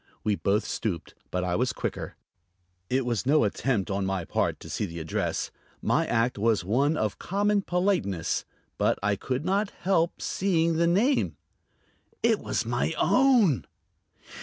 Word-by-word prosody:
We 105 Hz, -, +2 dB
both 100 Hz, +2 st, +1 dB
stooped, 90 Hz, -8 st, -3 dB, 0.2 s
but 90 Hz, 0 st, -1 dB
I 90 Hz, -1 st, 0 dB
was 125 Hz, +4 st, +1 dB
quicker. -, -, -4 dB, 0.7 s
It 130 Hz, 0 st, +1 dB
was 120 Hz, 0 st, -1 dB
no 150 Hz, 0 st, +5 dB
attempt 105 Hz, -1 st, 0 dB
on 100 Hz, 0 st, 0 dB
my 95 Hz, -3 st, -1 dB
part -, -, -1 dB
to -, -, -9 dB
see 105 Hz, -, -2 dB
the 85 Hz, -1 st, -8 dB
address; 80 Hz, -1 st, -2 dB, 0.3 s
my -, -, +1 dB
act 115 Hz, -1 st, +1 dB
was 110 Hz, -4 st, +2 dB
one 140 Hz, -, +2 dB
of 110 Hz, -6 st, -1 dB
common 205 Hz, +2 st, +1 dB
politeness. 175 Hz, -, 0 dB, 0.4 s
But -, -, +2 dB
I 100 Hz, 0 st, +2 dB
could 130 Hz, +8 st, -3 dB
not 195 Hz, +2 st, +1 dB
help 175 Hz, -3 st, 0 dB
seeing 170 Hz, -4 st, +1 dB
the 170 Hz, 0 st, +3 dB
name. 225 Hz, +11 st, +2 dB, 0.9 s
It 225 Hz, -2 st, +4 dB
was -, -, -2 dB
my 120 Hz, +7 st, -1 dB
own! 210 Hz, -, +4 dB
130 Hz, 155 wpm, -27 LUFS, -, 0.9 s, no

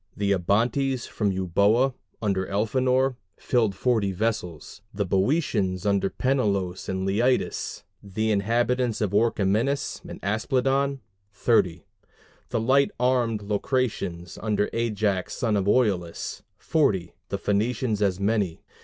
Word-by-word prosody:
The 100 Hz, -1 st, 0 dB
Abantes 120 Hz, +7 st, +1 dB
from 105 Hz, -2 st, -1 dB
Euboea, 100 Hz, +8 st, +2 dB, 0.3 s
under 95 Hz, -2 st, 0 dB
Elphenor, 130 Hz, +5 st, +1 dB, 0.2 s
filled 110 Hz, -6 st, +1 dB
40 110 Hz, -4 st, +1 dB
vessels; 95 Hz, -4 st, -3 dB
the 100 Hz, 0 st, -2 dB
Boeotians, 95 Hz, -, 0 dB
under 100 Hz, -1 st, +2 dB
Peneleos 100 Hz, -9 st, -1 dB
and 95 Hz, 0 st, -2 dB
Leitus, 120 Hz, +7 st, 0 dB, 0.2 s
50; 100 Hz, -2 st, -14 dB
the 110 Hz, 0 st, +1 dB
inhabitants 120 Hz, +3 st, +1 dB
of 105 Hz, -4 st, 0 dB
Orchomenus 110 Hz, +5 st, +1 dB
and -, -, -8 dB
Aspledon, 135 Hz, +6 st, 0 dB, 0.3 s
30; 90 Hz, -8 st, +1 dB, 0.6 s
the -, -, 0 dB
light 135 Hz, +5 st, +3 dB
armed 120 Hz, -4 st, +1 dB
Locrians, 100 Hz, -5 st, -2 dB
under 105 Hz, -1 st, 0 dB
Ajax 105 Hz, -5 st, -1 dB
son 115 Hz, -5 st, 0 dB
of 100 Hz, -2 st, +1 dB
Oileus, 100 Hz, -8 st, 0 dB, 0.2 s
40; 95 Hz, -, +1 dB, 0.2 s
the -, -, -2 dB
Phocians 110 Hz, +1 st, 0 dB
as 95 Hz, -2 st, +1 dB
many. 100 Hz, -4 st, 0 dB
105 Hz, 120 wpm, -25 LUFS, 100-125 Hz, 0.6 s, light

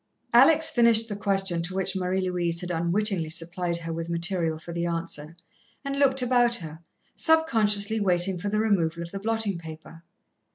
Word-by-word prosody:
Alex 320 Hz, 0 st, +6 dB
finished 230 Hz, -2 st, +3 dB
the 205 Hz, -, -4 dB
question 195 Hz, -4 st, 0 dB
to 180 Hz, +3 st, -4 dB
which 190 Hz, 0 st, 0 dB
Marie 185 Hz, 0 st, -1 dB
Louise 175 Hz, -2 st, -2 dB
had 180 Hz, 0 st, -5 dB
unwittingly 170 Hz, +1 st, 0 dB
supplied 170 Hz, +1 st, -1 dB
her 165 Hz, -1 st, -6 dB
with 165 Hz, +1 st, -5 dB
material 170 Hz, -1 st, -1 dB
for 170 Hz, +2 st, -10 dB
the 170 Hz, 0 st, -3 dB
answer, 165 Hz, -1 st, -4 dB, 0.5 s
and 275 Hz, 0 st, -3 dB
looked 270 Hz, -2 st, +3 dB
about 245 Hz, -1 st, +3 dB
her, 160 Hz, -5 st, -8 dB, 0.3 s
subconsciously 220 Hz, -10 st, +2 dB
waiting 180 Hz, -2 st, +1 dB
for 205 Hz, -, -3 dB
the 210 Hz, -, -1 dB
removal 170 Hz, -6 st, 0 dB
of 170 Hz, -, -10 dB
the 195 Hz, -, -6 dB
blotting 220 Hz, -3 st, -2 dB
paper. 160 Hz, 0 st, -11 dB
185 Hz, 170 wpm, -25 LUFS, 170-215 Hz, 0.5 s, Alex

